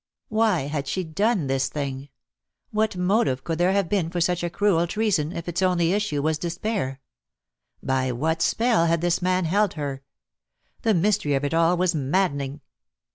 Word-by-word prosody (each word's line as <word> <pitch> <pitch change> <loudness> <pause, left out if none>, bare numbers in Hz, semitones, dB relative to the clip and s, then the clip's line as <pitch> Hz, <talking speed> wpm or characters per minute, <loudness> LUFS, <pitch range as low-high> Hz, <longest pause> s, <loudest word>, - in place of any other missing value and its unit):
Why 215 -5 +2
had 140 0 -3
she 185 +6 -1
done 195 +2 0
this 135 0 0
thing? 140 -1 -5 0.6
What 215 -2 0
motive 180 - +1
could 165 +2 -3
there 180 +2 +3
have 200 -3 +1
been 175 -3 0
for 175 +1 -3
such 175 +1 +1
cruel 175 -3 +2
treason, 185 -7 0
if 170 -1 -6
its 175 +1 -2
only 180 -2 +2
issue 195 -9 -1
was 155 0 0
despair? 175 -5 -3 0.8
By 130 -1 0
what 160 +7 -1
spell 225 -7 +2
had 165 0 +1
this 175 +1 +1
man 185 0 +1
held 200 +4 +1
her? 140 -3 -4 0.8
The 220 -3 +2
mystery 180 -5 +1
of 135 +1 -1
it 145 - -2
all 165 +2 +3
was 180 0 +2
maddening. 145 -2 -1
170 Hz, 170 wpm, -24 LUFS, 145-195 Hz, 0.8 s, there